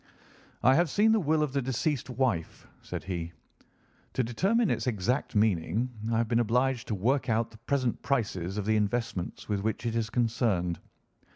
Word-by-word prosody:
"I 130 - +6
have 170 +3 +3
seen 210 +8 +4
the 220 - +4
will 155 -3 +2
of 145 -3 -2
the 140 - +1
deceased 130 +2 -1
wife," 120 -10 -1 0.2
said - - -6
he. 85 -3 -4 0.8
"To 130 - +1
determine 195 - +1
its - - -1
exact 120 +2 -1
meaning 105 +3 +1 0.2
I 115 - +2
have 115 0 +1
been 115 +1 +2
obliged 125 +2 +1
to 110 - -1
work 125 +8 +1
out 115 +1 +1
the 110 - -15
present 130 0 -1
prices 100 -8 -1
of 105 - -2
the 110 0 +3
investments 105 -3 -2
with 105 -2 0
which 110 +3 -2
it 115 -1 -1
is 115 -1 0
concerned. 110 -7 0
115 Hz, 180 wpm, -29 LUFS, 105-130 Hz, 0.8 s, I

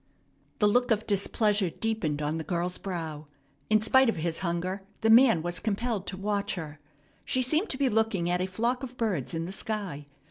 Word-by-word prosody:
The 210 - +4
look 245 +4 +3
of 220 -1 +1
displeasure 205 -1 +1
deepened 165 -8 -2
on 155 +2 -1
the - - -3
girl's 175 +3 -2
brow. 160 -5 -5 0.4
In 215 0 +4
spite 260 +2 +5
of - - 0
his 165 0 -1
hunger 185 +2 -2 0.2
the 225 - +4
man 230 -8 +6
was 175 0 -2
compelled 220 -1 -2
to 190 - -4
watch 205 +1 -1
her. 155 -4 -7 0.4
She 255 - +1
seemed 310 - +1
to 265 - -2
be 275 0 +2
looking 220 -6 +1
at 180 +1 +1
a 185 - 0
flock 235 +7 -1
of 255 -2 -7
birds 185 - -1
in 165 0 -2
the 180 - -6
sky. 195 -8 -4
200 Hz, 200 wpm, -28 LUFS, 170-225 Hz, 0.4 s, man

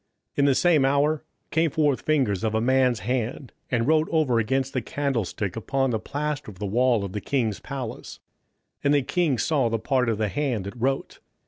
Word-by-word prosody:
27:005:005 - - -6
In 140 - +5
the 140 -2 +4
same 165 -4 +4
hour 140 +3 +2 0.3
came 160 +1 +2
forth 145 -3 +1
fingers 130 -11 +1
of 110 -1 0
a - - +3
man's 125 -1 +2
hand, 125 +3 -2 0.2
and 115 -2 +1
wrote 155 +1 +3
over 150 -8 +2
against 130 +4 0
the 130 - 0
candlestick 115 -7 -2
upon 135 +3 0
the 110 - 0
plaister 145 0 -3
of 100 - -12
the 105 - -4
wall 120 +1 +2
of 95 - -7
the 105 - -3
king's 115 -6 -1
palace: 130 -5 -7 0.6
and 145 0 +4
the 140 - +2
king 165 -4 +1
saw 135 0 +1
the 115 - 0
part 125 +1 +1
of 110 - 0
the 110 0 0
hand 130 -5 -1
that 100 - -5
wrote. 135 +3 -2
130 Hz, 205 wpm, -25 LUFS, 115-145 Hz, 0.6 s, In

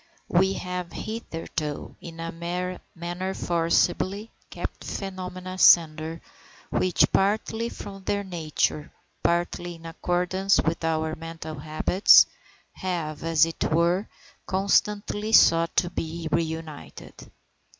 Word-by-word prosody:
We 190 +2 +3
have 180 -2 -5
hitherto, 165 -8 -5
in 165 -1 -10
a 165 0 -4 0.6
manner 175 +2 -4
forcibly, 175 +5 0 0.2
kept - - -6
phenomena 185 -1 -6
asunder, 165 -3 +4 0.5
which, 185 -1 +3
partly 220 +3 +1
from 195 -3 -9
their 200 0 0
nature, 160 -4 -2 0.3
partly 175 0 -1
in 165 0 -15
accordance 180 +3 +1
with 165 +1 0
our 160 -1 0
mental 160 -2 -7
habits, 155 +6 +5 0.5
have, 165 -5 -4
as 165 -1 +4
it 165 - -4
were, 170 +5 +2 0.4
constantly 205 +2 +1
sought 165 -4 +5
to 175 -1 +2
be 165 0 -4
reunited. 160 -1 -4
175 Hz, 105 wpm, -26 LUFS, 165-190 Hz, 0.6 s, habits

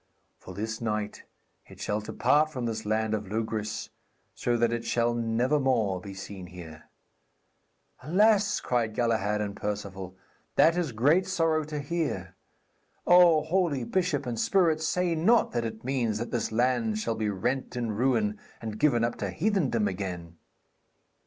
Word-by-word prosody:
'For 95 - -11
this 110 +2 -4
night 105 -2 -3 0.4
it - - -14
shall 105 +1 -1
depart 150 +8 +2
from 130 -6 -4
this 115 -2 -3
land 110 0 0
of 105 -2 -2
Logris, 110 -1 -3 0.4
so 120 -1 0
that 120 0 +2
it 120 0 -2
shall 120 0 +1
never 120 +5 +1
more 110 -9 +1
be 100 0 -9
seen 95 -1 -8
here. 85 -3 -11 1.2
'Alas,' 205 - +3
cried 115 -3 -1
Galahad 110 -3 +1
and 100 -1 -3
Perceval, 95 -3 -5 0.4
'that 165 - +5
is 175 -6 -1
great 150 +12 +3
sorrow 165 -4 +1
to 150 0 -5
hear. 140 - -3 0.7
O 175 -3 +6
holy 160 -5 0
bishop 145 -2 0
and 120 -2 -3
spirit, 165 - +2
say 175 +2 0
not 185 +9 +3
that 120 -1 -1
it 110 0 -6
means 120 -5 0
that 115 +2 -5
this 115 -2 -1
land 120 -2 +1
shall 115 +1 -1
be 110 -1 -1
rent 125 +8 -2
in 120 -2 -2
ruin 110 -2 +1 0.2
and 110 -2 -6
given 130 -6 +3
up 120 - -1
to - - -3
heathendom 155 - +1
again?' 90 -3 -5
115 Hz, 155 wpm, -28 LUFS, 105-150 Hz, 1.2 s, O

